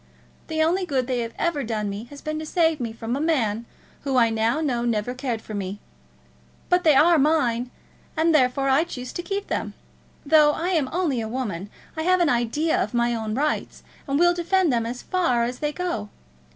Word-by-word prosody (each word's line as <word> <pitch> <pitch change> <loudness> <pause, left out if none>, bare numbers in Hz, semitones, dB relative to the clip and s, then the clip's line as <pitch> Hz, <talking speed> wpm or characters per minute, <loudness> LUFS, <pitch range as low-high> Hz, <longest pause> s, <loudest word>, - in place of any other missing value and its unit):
The 315 -1 +1
only 355 +4 +1
good 275 -7 0
they 250 -1 -1
have 230 -1 -4
ever 335 -5 0
done 220 -2 -2
me 200 +3 -5
has 285 +3 -12
been 310 0 -3
to 315 - -5
save 325 -2 +2
me 235 -3 -3
from 230 +2 -4
a - - -2
man 235 -8 0 0.3
who 270 -2 -1
I 230 -2 +4
now 225 +5 +1
know 255 -7 0
never 235 0 -1
cared 250 -4 -3
for 215 - -8
me. 200 0 -4 0.9
But 360 0 +3
they 310 -3 +5
are 330 +3 +6
mine; 255 -5 +2 0.5
and 325 +1 +3
therefore 270 -1 +3
I 270 +4 +4
choose 255 -7 -7
to - - -3
keep 395 +3 -3
them. - - -3 0.5
Though 300 0 +5
I 340 +4 -2
am 315 -8 +1
only 320 -9 0
a 220 - -4
woman 210 -7 -4 0.3
I 315 - -2
have 365 +3 +3
an 345 -3 +3
idea 245 +7 +1
of 210 +4 -3
my 240 0 +2
own 220 -2 -3
rights, 300 +3 -2 0.2
and 275 0 +1
will 350 +2 +5
defend 345 -2 +1
them 230 -1 0
as 245 +1 -6
far 255 -11 +1
as 245 +1 -3
they 295 0 -1
go. 295 -12 -3
270 Hz, 210 wpm, -24 LUFS, 235-320 Hz, 0.9 s, are